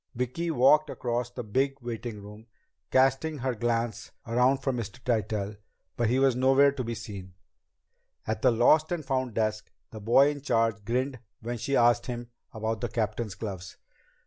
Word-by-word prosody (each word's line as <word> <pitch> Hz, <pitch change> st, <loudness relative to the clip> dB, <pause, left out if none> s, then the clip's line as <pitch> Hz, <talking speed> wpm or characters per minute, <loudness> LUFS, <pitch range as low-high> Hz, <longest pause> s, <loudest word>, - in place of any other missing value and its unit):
Vicki 125 Hz, +8 st, -2 dB
walked 150 Hz, +2 st, +4 dB
across 120 Hz, -2 st, -2 dB
the 125 Hz, 0 st, -7 dB
big 135 Hz, +6 st, 0 dB
waiting 115 Hz, -3 st, -6 dB
room, 105 Hz, +2 st, -12 dB, 0.4 s
casting 135 Hz, +4 st, +2 dB
her 130 Hz, -1 st, -1 dB
glance 115 Hz, 0 st, -2 dB, 0.2 s
around 125 Hz, +4 st, +3 dB
for 135 Hz, 0 st, -2 dB
Mr. 120 Hz, 0 st, -5 dB
Tytell, 105 Hz, -3 st, -1 dB, 0.4 s
but 120 Hz, -2 st, +1 dB
he 125 Hz, -, +2 dB
was 135 Hz, -2 st, +3 dB
nowhere 135 Hz, +2 st, +5 dB
to 135 Hz, -2 st, -4 dB
be 115 Hz, 0 st, -4 dB
seen. 95 Hz, -5 st, -9 dB, 0.9 s
At 110 Hz, 0 st, -2 dB
the -, -, +5 dB
Lost 140 Hz, +8 st, +4 dB
and 165 Hz, -4 st, -2 dB
Found 130 Hz, -4 st, -1 dB
desk, 110 Hz, -1 st, -1 dB, 0.2 s
the 110 Hz, -, -8 dB
boy 135 Hz, +7 st, +5 dB
in 145 Hz, -1 st, -7 dB
charge 115 Hz, -5 st, +1 dB
grinned 130 Hz, +3 st, -1 dB, 0.2 s
when 120 Hz, +1 st, -4 dB
she 140 Hz, +5 st, -1 dB
asked 120 Hz, 0 st, +3 dB, 0.4 s
about 110 Hz, 0 st, -3 dB
the 120 Hz, -, -2 dB
captain's 110 Hz, -2 st, -2 dB
gloves. 95 Hz, -5 st, -7 dB
120 Hz, 165 wpm, -28 LUFS, 110-135 Hz, 0.9 s, nowhere